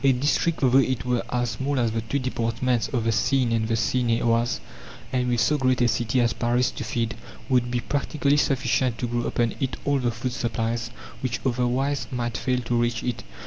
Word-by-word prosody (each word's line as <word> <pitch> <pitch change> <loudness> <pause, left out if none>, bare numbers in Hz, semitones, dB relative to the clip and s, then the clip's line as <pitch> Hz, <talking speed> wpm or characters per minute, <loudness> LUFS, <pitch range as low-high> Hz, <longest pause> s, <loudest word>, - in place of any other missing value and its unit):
A 135 - +6
district, 145 +5 +1
though 130 0 +5
it 130 -3 0
were 125 -1 +1
as 120 -1 0
small 140 +1 -2
as 115 -2 +1
the 115 0 -1
two 115 +5 -2
departments 125 -2 0
of 120 -4 -1
the 115 - +2
Seine 120 +2 +2
and 110 -1 +1
the 115 - +1
Seine 115 +1 +1
et - - -3
Oise, 115 0 +1 0.5
and 125 -1 +1
with 120 -1 +1
so 150 +6 +2
great 130 -1 +2
a 120 - +4
city 120 +1 +1
as 120 -1 +2
Paris 120 +1 +1
to - - -6
feed, 115 0 -1 0.4
would 125 -2 +2
be 120 0 -1
practically 145 +1 0
sufficient 130 -4 +1
to - - -2
grow 120 0 -1
upon 120 -1 0
it 135 -3 -2
all 140 -1 +2
the 125 -2 +1
food 120 +2 -3
supplies, 115 -1 -2 0.3
which 125 -2 -2
otherwise 130 +3 0
might 120 -2 -3
fail 125 -1 0
to 120 0 -1
reach 120 0 -1
it. 125 -2 -2
125 Hz, 215 wpm, -25 LUFS, 115-130 Hz, 0.5 s, A